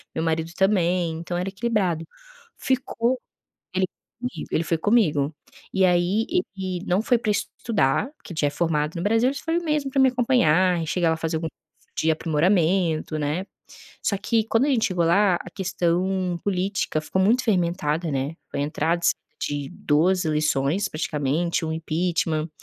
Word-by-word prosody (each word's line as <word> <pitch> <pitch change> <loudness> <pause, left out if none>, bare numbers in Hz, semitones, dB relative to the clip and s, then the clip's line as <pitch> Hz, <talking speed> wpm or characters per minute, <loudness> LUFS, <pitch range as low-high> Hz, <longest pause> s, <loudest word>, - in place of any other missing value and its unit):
meu 160 - -1
marido 160 0 0
também, 180 -3 +2
então 175 +1 -4
era 180 +2 -2
equilibrado. 195 -6 -1 0.5
Ficou 255 -1 0 0.6
ele 190 - +1
foi - - -46 0.3
comigo 250 +1 -5
ele 160 - +2
foi 165 -1 0
comigo. 160 -9 +2 0.4
E 190 -1 +3
aí 180 +5 +2 0.3
ele 185 -1 -4
não 185 +4 +2
foi 245 0 +3
para 215 - -1
estudar, 205 - 0
porque 175 - -11
já 145 - +3
é - - +1
formado 150 -1 0
no 170 - -3
Brasil, 225 +5 +3
ele 275 - -1
só - - -6
foi 325 +2 +1
mesmo 300 -5 -1
para 270 - +1
me 265 - +6
acompanhar, 185 - +3
e - - -4
chegar 170 +1 +1
lá - - +2
e - - -14
fazer 160 0 -2
algum 160 0 -3 0.5
de 160 - +2
aprimoramento, 165 0 +1
né. 150 +6 -2 0.6
Só 200 - +1
que 225 0 +1
quando 225 +5 +2
a - - 0
gente 240 -5 +2
chegou 180 -3 0
lá, 185 +2 +4
a 175 - -8
questão 180 0 0
política 190 -4 0
ficou 190 +4 -1
muito 235 +6 +3
fermentada, 170 -5 0
né. 135 +4 -2
Foi 140 - -3
a - - +1
entrada 160 +3 0
s - - +5 0.3
de 145 -1 -3
2 180 +3 +2
eleições, 155 +4 +1
praticamente, 155 +2 -1
um 160 - -2
impeachment. 160 -1 -1
175 Hz, 175 wpm, -24 LUFS, 160-205 Hz, 0.6 s, me